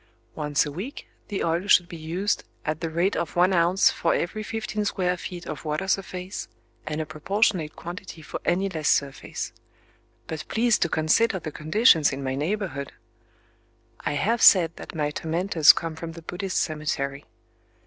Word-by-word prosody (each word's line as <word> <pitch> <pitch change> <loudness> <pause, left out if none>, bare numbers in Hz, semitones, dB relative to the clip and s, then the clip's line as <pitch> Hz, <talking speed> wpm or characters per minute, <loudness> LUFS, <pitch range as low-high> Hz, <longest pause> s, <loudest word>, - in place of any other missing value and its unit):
Once 150 0 0
a 145 - -5
week 195 - -7 0.2
the 205 - -2
oil 170 +4 0
should 180 -3 +5
be 175 - -9
used, 170 +6 -1 0.2
"at 155 0 -2
the 165 - -2
rate 170 +5 +1
of 170 - -3
once 180 +2 +4
ounce 175 +2 +4
for 165 - +1
every 195 +5 -2
fifteen 215 0 -3
square 180 -3 0
feet 175 0 -7
of - - -6
water 155 +4 -2
surface, 185 0 -3 0.4
and 155 0 -2
a 155 - -2
proportionate 160 +1 0
quantity 175 -1 -8
for - - -6
any 185 +3 +1
less 160 -5 -1
surface." 140 -1 -1 0.7
...But 160 -1 -6
please 235 0 +2
to 170 - +1
consider 190 +8 +2
the 155 -3 -6
conditions 155 - +4
in 135 0 -5
my 130 0 -1
neighborhood! 150 -1 -3 1.1
I - - -2
have 225 +11 +1
said 170 -4 +7
that - - -9
my 150 -2 0
tormentors 165 0 +4
come 165 -1 -4
from 165 0 -7
the 165 0 -11
Buddhist 185 +3 -3
cemetery. 145 -3 -2
170 Hz, 170 wpm, -25 LUFS, 155-190 Hz, 1.1 s, said